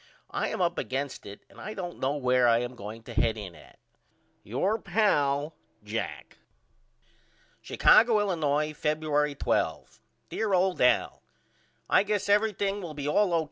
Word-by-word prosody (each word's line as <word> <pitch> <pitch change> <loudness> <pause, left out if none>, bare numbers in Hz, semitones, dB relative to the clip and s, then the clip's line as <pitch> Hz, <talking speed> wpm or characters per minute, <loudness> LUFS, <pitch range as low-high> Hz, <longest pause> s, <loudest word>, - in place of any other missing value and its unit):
I - - -1
am - - -3
up 170 -1 0
against 135 +2 -4
it 100 0 -10
and - - -17
I 215 - -6
don't 175 -3 -6
know 135 +2 0
where 125 -3 +2
I 115 0 +4
am 120 +1 -5
going 110 0 -9
to 120 - -10
head 110 0 +1
in 100 -4 -7
at. 75 - -17 0.7
Your 190 - -1
pal, 150 -8 +1 0.3
JACK. - - -5 1.2
Chicago, 225 -1 +5
Illinois, 155 -6 0
Febuer'y 150 -1 -1
12. - - -2 0.3
DEAR 210 -3 0
OLD 185 0 +1
AL: 125 - +2 0.7
I - - +4
guess 205 -1 -1
everthing 205 -1 +1
will 165 -4 -7
be 145 -1 -4
all 185 +5 +2
O.K. 165 - +3
150 Hz, 150 wpm, -28 LUFS, 125-195 Hz, 1.2 s, Chicago